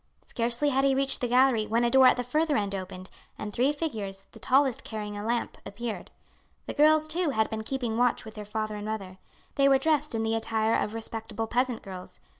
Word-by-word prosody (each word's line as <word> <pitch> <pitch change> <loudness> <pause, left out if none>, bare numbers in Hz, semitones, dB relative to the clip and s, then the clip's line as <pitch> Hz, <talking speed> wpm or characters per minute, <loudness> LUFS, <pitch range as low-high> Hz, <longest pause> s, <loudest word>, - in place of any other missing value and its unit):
Scarcely 240 +5 0
had 270 0 +1
he 275 -1 +3
reached 275 0 0
the 245 - +1
gallery 245 -3 +3
when 230 +2 +1
a 240 - +2
door 265 -1 +7
at - - +4
the 245 - -1
further 300 +5 +1
end 200 -2 -1
opened, 185 -1 -6 0.3
and 210 -1 -6
three 255 +6 +2
figures, 215 -11 -4
the - - -13
tallest 265 -1 +2
carrying 210 -2 -5
a 205 - -5
lamp, 235 +2 -2
appeared. 225 +2 -6 0.6
The - - -5
girls, 310 +1 +4
too, 335 +1 0
had 220 -5 0
been 220 0 -3
keeping 235 -1 -2
watch 245 -2 +2
with 220 - -9
their 210 -1 -7
father 215 +1 -3
and 205 0 -6
mother. 195 -4 -5 0.3
They 275 0 +4
were 270 - +6
dressed 295 -2 +1
in 225 - 0
the 225 0 0
attire 225 0 0
of 215 - 0
respectable 225 0 -4
peasant 245 +1 -1
girls. 185 - -9
230 Hz, 220 wpm, -28 LUFS, 215-270 Hz, 0.6 s, door